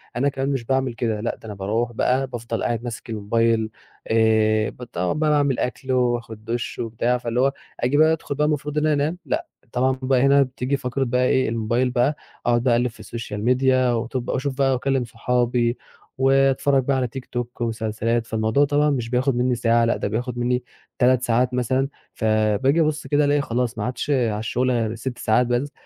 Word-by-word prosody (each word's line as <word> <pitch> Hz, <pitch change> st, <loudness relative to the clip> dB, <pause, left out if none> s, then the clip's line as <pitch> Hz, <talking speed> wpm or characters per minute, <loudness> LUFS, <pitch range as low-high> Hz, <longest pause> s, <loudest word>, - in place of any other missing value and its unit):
أنا 140 Hz, +4 st, +2 dB
كمان 135 Hz, 0 st, -2 dB
مش 135 Hz, -4 st, -1 dB
باعمل 130 Hz, 0 st, 0 dB
كده 115 Hz, -2 st, -2 dB
لأ 115 Hz, -, -2 dB
ده -, -, -17 dB
أنا 105 Hz, -, -6 dB
باروّح 110 Hz, +5 st, -1 dB
بقى 130 Hz, +3 st, +1 dB
بافضل 120 Hz, -2 st, -4 dB
قاعد 120 Hz, -1 st, -1 dB
ماسك 120 Hz, -1 st, -7 dB
الموبايل 110 Hz, +1 st, +1 dB, 0.4 s
آآ، 110 Hz, -1 st, +3 dB
ب 125 Hz, -, -11 dB
طبعًا 90 Hz, -6 st, -2 dB
بقى 155 Hz, 0 st, +1 dB
باعمل 145 Hz, -3 st, +2 dB
أكل 130 Hz, +1 st, -3 dB
وآخد 120 Hz, -3 st, -1 dB
دُشّ 115 Hz, +1 st, -3 dB
وبتاع، 115 Hz, +2 st, 0 dB
فاللي 120 Hz, 0 st, -2 dB
هو 135 Hz, +1 st, +2 dB, 0.3 s
آجي 130 Hz, +4 st, +1 dB
بقى 155 Hz, +1 st, +5 dB
أدخل 150 Hz, -3 st, -4 dB
بقى 150 Hz, +1 st, +1 dB
المفروض 150 Hz, 0 st, -2 dB
إن 150 Hz, -, +2 dB
أنام 155 Hz, +2 st, +1 dB
لأ، 330 Hz, +3 st, -2 dB, 0.2 s
طبعًا 130 Hz, +1 st, +1 dB
بقى 130 Hz, -1 st, +2 dB
هنا 140 Hz, 0 st, +5 dB
بتيجي 130 Hz, +1 st, -2 dB
فقرة 125 Hz, +1 st, -2 dB
بقى 125 Hz, 0 st, +1 dB
إيه 130 Hz, -1 st, +2 dB
الموبايل 115 Hz, +3 st, 0 dB
بقى 130 Hz, +4 st, +2 dB, 0.3 s
أقعد 120 Hz, 0 st, +2 dB
بقى 125 Hz, -2 st, +3 dB
أقلِّب 120 Hz, +1 st, +2 dB
في 115 Hz, -, -11 dB
السوشيال 110 Hz, -3 st, -6 dB
ميديا 130 Hz, 0 st, +3 dB
واتوب 120 Hz, +2 st, -2 dB
وأشوف 135 Hz, +1 st, -2 dB
بقى 135 Hz, -1 st, +3 dB
وأكلّم 130 Hz, 0 st, 0 dB
صحابي 120 Hz, 0 st, 0 dB, 0.4 s
وأتفرّج 135 Hz, 0 st, +3 dB
بقى 135 Hz, 0 st, +1 dB
على 125 Hz, -1 st, 0 dB
تيك 130 Hz, +2 st, -8 dB
توك 120 Hz, 0 st, -5 dB
ومسلسلات، 115 Hz, 0 st, -1 dB
فالموضوع 110 Hz, +6 st, +2 dB
طبعًا 145 Hz, +1 st, +2 dB
مش 120 Hz, -5 st, -1 dB
بياخد 130 Hz, +1 st, +1 dB
مني 125 Hz, +1 st, +1 dB
ساعة 115 Hz, 0 st, +3 dB
لأ 115 Hz, -, +1 dB
ده -, -, -2 dB
بياخد 120 Hz, +3 st, -3 dB
مني 125 Hz, +1 st, 0 dB, 0.4 s
3 125 Hz, 0 st, +4 dB
ساعات 125 Hz, +1 st, +1 dB
مثلًا، 130 Hz, +2 st, +1 dB, 0.3 s
فباجي 110 Hz, +7 st, +2 dB
أبُصّ 155 Hz, 0 st, -1 dB
كده 145 Hz, 0 st, +3 dB
ألاقي 145 Hz, 0 st, +2 dB
خلاص 120 Hz, -2 st, -2 dB
ما -, -, -2 dB
عادش 125 Hz, +3 st, -4 dB
على 115 Hz, -6 st, +1 dB
الشغل 125 Hz, +3 st, 0 dB
غير 115 Hz, -2 st, 0 dB
6 120 Hz, +2 st, -5 dB
ساعات 120 Hz, +2 st, +2 dB
بس، 125 Hz, +4 st, -1 dB
125 Hz, 195 wpm, -22 LUFS, 115-135 Hz, 0.4 s, بقى